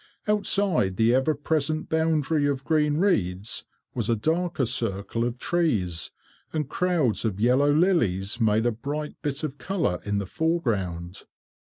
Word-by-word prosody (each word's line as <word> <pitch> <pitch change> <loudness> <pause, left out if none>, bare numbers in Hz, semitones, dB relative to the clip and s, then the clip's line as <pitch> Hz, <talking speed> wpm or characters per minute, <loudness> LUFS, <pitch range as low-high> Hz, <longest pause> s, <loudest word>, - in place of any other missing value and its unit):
Outside 200 - +2
the 115 +1 +4
ever 135 +4 +2
present 155 +1 -1
boundary 160 -2 +1
of 140 -1 -1
green 150 -2 +2
reeds, 105 - 0 0.3
was - - -1
a 115 - +3
darker 165 +5 0
circle 110 0 -1
of 120 +1 -2
trees, 110 - 0 0.4
and 150 -3 -2
crowds 165 - 0
of 105 -4 -2
yellow 130 +6 +3
lilies 120 - +1
made 110 +1 +3
a 120 - +3
bright 145 +7 -5
bit 145 +1 -3
of 145 -2 -4
colour 175 - -1
in 105 0 -1
the 100 - -2
foreground. 95 - -2
140 Hz, 145 wpm, -25 LUFS, 105-160 Hz, 0.4 s, the